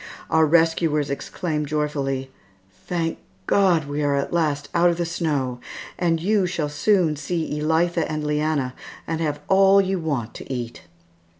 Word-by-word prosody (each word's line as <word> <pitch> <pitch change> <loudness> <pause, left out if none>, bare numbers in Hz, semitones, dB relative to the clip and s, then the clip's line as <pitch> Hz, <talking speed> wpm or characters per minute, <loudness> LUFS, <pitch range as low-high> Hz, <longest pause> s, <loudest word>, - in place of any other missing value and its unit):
Our 160 -1 +4
rescuers 160 -2 +2
exclaimed 150 +1 -3
joyfully, 140 -3 -2 0.6
"Thank 165 -2 -1 0.3
God, 180 - +3
we 145 +1 -2
are 145 -1 +2
at 140 +3 -2
last 150 -4 0
out 175 +1 +4
of 170 - -1
the 175 - -1
snow, 145 -7 -2 0.4
and 170 -2 +2
you 195 +2 +2
shall 165 -4 -2
soon 165 +1 +2
see 150 0 -3
Elitha 165 +1 +1
and 155 0 -2
Leanna, 150 -3 0 0.3
and 165 0 -3
have 150 -2 -2
all 195 0 +6
you 190 -1 +1
want 140 -9 -2
to - - -9
eat." 120 -2 -5
155 Hz, 155 wpm, -23 LUFS, 145-170 Hz, 0.6 s, all